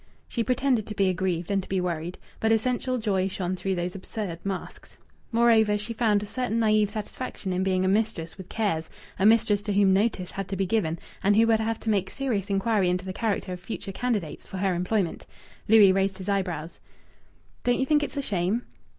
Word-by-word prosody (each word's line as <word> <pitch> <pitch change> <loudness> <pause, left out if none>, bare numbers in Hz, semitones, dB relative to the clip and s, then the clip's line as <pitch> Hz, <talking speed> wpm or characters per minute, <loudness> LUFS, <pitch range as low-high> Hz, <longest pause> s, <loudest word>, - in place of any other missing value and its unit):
She 235 - -1
pretended 250 -1 +1
to 210 - -6
be 195 -2 +3
aggrieved 180 -1 -1
and 195 -1 +2
to - - -13
be 190 - +1
worried, 175 -1 -3 0.2
but 220 - +2
essential 250 +3 +1
joy 195 -5 0
shone 185 -1 -2
through 190 +1 -2
these 175 0 -2
absurd 195 -2 -5
masks. 195 -2 -6 0.3
Moreover, 225 -3 +4
she 210 +3 -4
found 215 -3 +2
a - - -4
certain 230 +1 -2
naïve 215 -2 +3
satisfaction 210 -2 -5
in 180 - 0
being 185 -1 +1
a - - +2
mistress 200 -5 0
with 190 -2 -11
cares, 195 -8 -1 0.3
a 195 - +5
mistress 215 -2 +4
to 205 0 -2
whom 195 -1 +4
"notice" 195 -3 +1
had 195 -1 -4
to 195 - -3
be 195 0 0
given, 175 -5 0 0.3
and 205 +1 +4
who 225 +2 +6
would 225 -1 +3
have 225 0 -1
to 220 - 0
make 195 -3 +1
serious 225 -8 -2
inquiry 195 -1 +2
into 180 +1 -1
the 185 - -4
character 200 -3 -1
of 180 - -6
future 195 +1 -6
candidates 210 -7 -2
for 190 - -8
her 190 0 +1
employment. 180 +1 -1 0.4
Louis 210 -3 +7
raised 195 0 +1
his 190 -1 -8
eyebrows. 180 -5 -2 0.8
"Don't 245 0 +2
you 265 - +2
think 295 +2 +3
it's 290 0 -4
a 280 - -1
shame?" 200 +2 0
200 Hz, 210 wpm, -26 LUFS, 185-225 Hz, 0.8 s, Louis